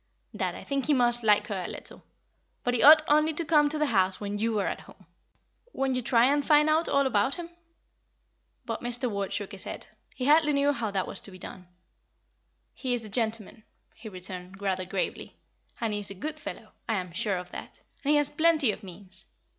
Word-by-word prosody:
Dad, -, -, -2 dB
I -, -, -9 dB
think 275 Hz, -1 st, -2 dB
he 295 Hz, -, +4 dB
must 240 Hz, -1 st, +2 dB
like 210 Hz, -2 st, +4 dB
her 195 Hz, -4 st, -3 dB
a -, -, -4 dB
little; -, -, -8 dB, 0.6 s
but 245 Hz, -, 0 dB
he 245 Hz, -, +1 dB
ought 310 Hz, +2 st, +9 dB
only 305 Hz, +1 st, +3 dB
to 335 Hz, -, 0 dB
come 295 Hz, -1 st, +4 dB
to 305 Hz, -, +1 dB
the 300 Hz, -, +2 dB
house 190 Hz, -7 st, +1 dB
when 205 Hz, 0 st, -4 dB
you 225 Hz, 0 st, 0 dB
are 200 Hz, -, 0 dB
at -, -, -2 dB
home. 190 Hz, -, -17 dB, 0.7 s
Won't 270 Hz, 0 st, 0 dB
you 255 Hz, -, -1 dB
try 235 Hz, 0 st, +4 dB
and 285 Hz, +2 st, +2 dB
find 300 Hz, 0 st, +4 dB
out 320 Hz, +2 st, +2 dB
all 280 Hz, 0 st, +3 dB
about 260 Hz, +1 st, +1 dB
him?" 340 Hz, -1 st, -7 dB, 1.1 s
But 230 Hz, -2 st, -4 dB
Mr. 245 Hz, +1 st, -1 dB
Ward 200 Hz, -1 st, -3 dB
shook 205 Hz, -, -3 dB
his 195 Hz, -, -4 dB
head; -, -, -4 dB, 0.3 s
he 255 Hz, -, -3 dB
hardly 300 Hz, +1 st, +5 dB
knew 285 Hz, +1 st, +3 dB
how 235 Hz, -5 st, -2 dB
that 195 Hz, -2 st, -1 dB
was 195 Hz, -, -7 dB
to -, -, -12 dB
be 185 Hz, -, -12 dB
done. 185 Hz, 0 st, -10 dB, 1.1 s
"He 255 Hz, -2 st, -1 dB
is 230 Hz, -2 st, -4 dB
a -, -, -7 dB
gentleman," 220 Hz, -1 st, -2 dB, 0.3 s
he 220 Hz, -, -10 dB
returned, 185 Hz, 0 st, -6 dB
rather 190 Hz, -2 st, -1 dB
gravely, 185 Hz, 0 st, -4 dB, 0.4 s
"and 225 Hz, -2 st, -1 dB
he 205 Hz, -, -1 dB
is 205 Hz, -, -2 dB
a 200 Hz, -, -7 dB
good 305 Hz, +9 st, -5 dB
fellow -, -, -8 dB, 0.2 s
I 225 Hz, -, +2 dB
am 180 Hz, -3 st, -4 dB
sure 195 Hz, +2 st, -1 dB
of 180 Hz, 0 st, -8 dB
that; -, -, -9 dB, 0.2 s
and 285 Hz, -, -1 dB
he 300 Hz, -, +5 dB
has 290 Hz, -1 st, +2 dB
plenty 315 Hz, -5 st, +3 dB
of -, -, -8 dB
means. 190 Hz, 0 st, -10 dB
235 Hz, 220 wpm, -28 LUFS, 200-290 Hz, 1.1 s, ought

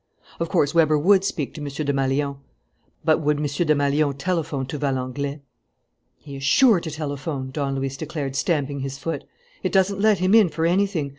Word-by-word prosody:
Of 170 Hz, -1 st, -2 dB
course, 145 Hz, -, +2 dB
Weber 155 Hz, -2 st, +4 dB
would 190 Hz, +5 st, +4 dB
speak 155 Hz, -8 st, -3 dB
to 150 Hz, -, -8 dB
M. 145 Hz, -, -4 dB
Desmalions. 140 Hz, -1 st, -1 dB, 0.7 s
But 155 Hz, -, +4 dB
would 150 Hz, -1 st, +1 dB
M. 150 Hz, -, -2 dB
Desmalions 145 Hz, -1 st, +1 dB
telephone 155 Hz, -4 st, -2 dB
to 140 Hz, +3 st, -6 dB
Valenglay? 140 Hz, +1 st, -2 dB, 0.8 s
"He 140 Hz, -2 st, -10 dB
is 135 Hz, -, -8 dB
sure 220 Hz, -, +5 dB
to 165 Hz, -, -6 dB
telephone," 145 Hz, -2 st, -4 dB
Don 140 Hz, -1 st, -2 dB
Luis 135 Hz, 0 st, -3 dB
declared, 145 Hz, -3 st, -4 dB
stamping 145 Hz, -2 st, 0 dB
his 135 Hz, 0 st, -4 dB
foot. 165 Hz, +4 st, -4 dB, 0.4 s
"It -, -, -1 dB
doesn't 195 Hz, +1 st, +2 dB
let 215 Hz, -1 st, +4 dB
him 185 Hz, +3 st, +1 dB
in 220 Hz, -5 st, +6 dB
for 160 Hz, 0 st, -2 dB
anything. 180 Hz, -4 st, +1 dB
145 Hz, 175 wpm, -23 LUFS, 140-165 Hz, 0.8 s, in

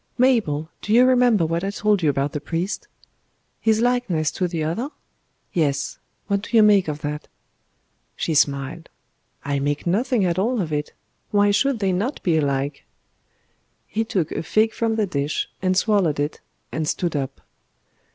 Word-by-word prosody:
Mabel, 220 Hz, -, +2 dB
do 210 Hz, -, -1 dB
you 245 Hz, +2 st, +7 dB
remember 245 Hz, -7 st, +4 dB
what 165 Hz, +2 st, -1 dB
I 195 Hz, -, -1 dB
told 210 Hz, -1 st, +1 dB
you 155 Hz, -, +3 dB
about 140 Hz, +1 st, 0 dB
the 150 Hz, -, -4 dB
priest?" 170 Hz, +6 st, -3 dB, 0.7 s
"His 220 Hz, 0 st, +2 dB
likeness 235 Hz, -11 st, +1 dB
to 180 Hz, -, -1 dB
the 165 Hz, -2 st, -3 dB
other?" 215 Hz, -, -2 dB, 0.6 s
"Yes. 140 Hz, -4 st, 0 dB, 0.3 s
What 200 Hz, -1 st, 0 dB
do 230 Hz, -, 0 dB
you 220 Hz, -, +8 dB
make 205 Hz, -4 st, +5 dB
of 150 Hz, 0 st, -4 dB
that?" 150 Hz, 0 st, -4 dB, 0.9 s
She 165 Hz, -, -1 dB
smiled. 140 Hz, +2 st, 0 dB, 0.6 s
"I 140 Hz, 0 st, 0 dB
make 145 Hz, +1 st, -1 dB
nothing 215 Hz, +4 st, +1 dB
at 175 Hz, 0 st, 0 dB
all 235 Hz, +5 st, +1 dB
of 160 Hz, -5 st, -2 dB
it. 150 Hz, 0 st, -2 dB, 0.4 s
Why 205 Hz, 0 st, +3 dB
should 270 Hz, +5 st, +2 dB
they 195 Hz, -3 st, 0 dB
not 210 Hz, +10 st, -2 dB
be 170 Hz, -3 st, +2 dB
alike?" 140 Hz, -1 st, -1 dB, 1.0 s
He 225 Hz, -, -1 dB
took 195 Hz, -9 st, -1 dB
a -, -, -2 dB
fig 215 Hz, +6 st, +2 dB
from 225 Hz, -1 st, 0 dB
the 220 Hz, -1 st, +1 dB
dish, 145 Hz, -5 st, -2 dB
and 185 Hz, 0 st, +1 dB
swallowed 190 Hz, -8 st, +2 dB
it, 145 Hz, +1 st, -2 dB, 0.3 s
and 155 Hz, -1 st, -2 dB
stood 170 Hz, 0 st, -1 dB
up. 135 Hz, -2 st, -3 dB
180 Hz, 170 wpm, -22 LUFS, 150-215 Hz, 1.0 s, you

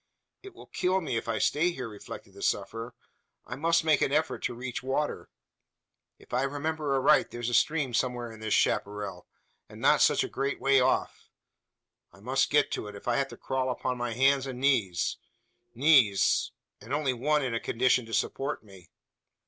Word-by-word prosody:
"It 390 Hz, -2 st, -12 dB
will -, -, -13 dB
kill 185 Hz, +1 st, 0 dB
me, 160 Hz, -9 st, -3 dB
if 115 Hz, -, -3 dB
I 115 Hz, -1 st, -1 dB
stay 150 Hz, -, +2 dB
here?" 130 Hz, -8 st, -5 dB
reflected 105 Hz, -2 st, -10 dB
the -, -, -12 dB
sufferer. 115 Hz, +2 st, -2 dB, 0.5 s
"I -, -, -6 dB
must 165 Hz, +4 st, +2 dB
make 155 Hz, -3 st, +3 dB
an -, -, +2 dB
effort 155 Hz, +2 st, 0 dB
to -, -, -2 dB
reach 125 Hz, 0 st, -5 dB
water. 135 Hz, +3 st, -2 dB, 0.9 s
If -, -, -17 dB
I 125 Hz, -, +2 dB
remember 145 Hz, +1 st, -2 dB
aright 135 Hz, -, +4 dB
there's 120 Hz, 0 st, -4 dB
a -, -, -4 dB
stream 140 Hz, +1 st, +2 dB
somewhere 120 Hz, -1 st, -1 dB
in 110 Hz, -, -12 dB
this 110 Hz, -1 st, 0 dB
chapparal, 100 Hz, -3 st, -1 dB, 0.4 s
and -, -, -12 dB
not -, -, +4 dB
such -, -, +4 dB
a -, -, -3 dB
great 140 Hz, +1 st, -3 dB
way 135 Hz, 0 st, +4 dB
off. 130 Hz, -, 0 dB, 0.8 s
I -, -, -19 dB
must 130 Hz, +6 st, 0 dB
get 150 Hz, -1 st, +3 dB
to -, -, -3 dB
it, 105 Hz, -, -9 dB
if 100 Hz, -, -11 dB
I 120 Hz, -, +2 dB
have 140 Hz, -1 st, +1 dB
to -, -, -12 dB
crawl 130 Hz, -1 st, -2 dB
upon 125 Hz, 0 st, -2 dB
my 120 Hz, -1 st, -3 dB
hands 135 Hz, +2 st, +3 dB
and 125 Hz, -2 st, -6 dB
knees. 115 Hz, -11 st, +1 dB, 0.6 s
Knees! 125 Hz, -7 st, +4 dB, 0.3 s
and 115 Hz, +7 st, -3 dB
only 145 Hz, -3 st, 0 dB
one 150 Hz, +4 st, +1 dB
in 125 Hz, -3 st, -2 dB
a 115 Hz, -, 0 dB
condition 125 Hz, 0 st, +1 dB
to 115 Hz, -, -9 dB
support 135 Hz, +5 st, -2 dB
me! 95 Hz, -5 st, -16 dB
130 Hz, 190 wpm, -28 LUFS, 115-140 Hz, 0.9 s, aright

